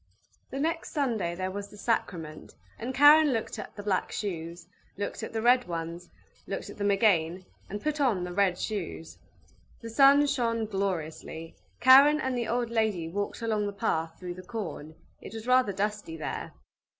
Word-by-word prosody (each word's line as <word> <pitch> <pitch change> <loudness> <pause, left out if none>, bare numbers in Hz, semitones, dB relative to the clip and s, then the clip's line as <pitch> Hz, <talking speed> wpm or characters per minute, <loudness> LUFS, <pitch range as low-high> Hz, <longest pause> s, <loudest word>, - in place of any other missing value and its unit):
The 270 - -5
next 325 +3 -2
Sunday 225 - -1
there 185 +1 -3
was 200 +1 -5
the 210 - -14
sacrament, 170 -8 -3 0.2
and 240 +3 -3
Karen 290 +3 +7
looked 225 - -3
at - - -8
the 205 - -7
black 195 -3 0
shoes, 170 -3 -5 0.3
looked 205 - -4
at - - -5
the 225 -1 -3
red 245 +1 +4
ones 170 0 -5 0.4
looked - - -5
at - - -14
them 205 0 +1
again, 185 -4 +2 0.2
and 205 +1 -6
put 305 -1 -1
on 220 -10 +2
the 180 0 -5
red 190 -2 +2
shoes. 80 - -5 0.6
The 230 - -7
sun 280 +4 +6
shone 235 -5 0
gloriously; 165 -5 -4 0.3
Karen 275 +4 +8
and 260 -3 -1
the 235 -2 -2
old 240 0 -1
lady 215 -8 0
walked 205 +5 -4
along 215 -2 0
the 200 - -4
path 165 -6 -2
through 180 -1 -5
the 185 - -10
corn; 185 -7 -6 0.3
it - - -9
was 220 0 -7
rather 255 -3 +4
dusty 200 -4 -3
there. 155 - -5
205 Hz, 175 wpm, -28 LUFS, 175-240 Hz, 0.6 s, Karen